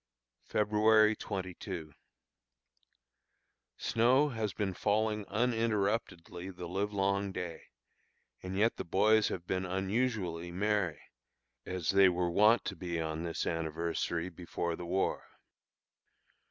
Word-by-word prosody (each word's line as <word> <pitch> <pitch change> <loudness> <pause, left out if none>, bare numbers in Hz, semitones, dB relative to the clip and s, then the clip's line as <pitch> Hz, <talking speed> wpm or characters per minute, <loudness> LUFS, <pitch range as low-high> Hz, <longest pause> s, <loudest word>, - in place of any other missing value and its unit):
February 110 +1 +4
22. 95 -6 -5 1.8
Snow 125 +6 +3
has 110 -5 -2
been 95 +1 -2
falling 105 +1 0
uninterruptedly 105 -6 -1
the 90 -2 -7
livelong 100 +1 0
day, 90 -3 -6 0.8
and 95 +1 -5
yet 110 +3 +2
the - - -3
boys 110 +5 +3
have 90 -2 -4
been 95 0 -1
unusually 95 -2 -1
merry, 95 -4 0 0.6
as 90 -4 -1
they 95 -1 +6
were 90 -1 0
wont 105 +6 +5
to 95 - -3
be 85 -1 -3
on 80 0 -3
this 85 -1 -3
anniversary 85 +1 -2
before 85 0 -3
the 85 - -7
war. 95 +2 -1
95 Hz, 110 wpm, -32 LUFS, 85-105 Hz, 1.8 s, they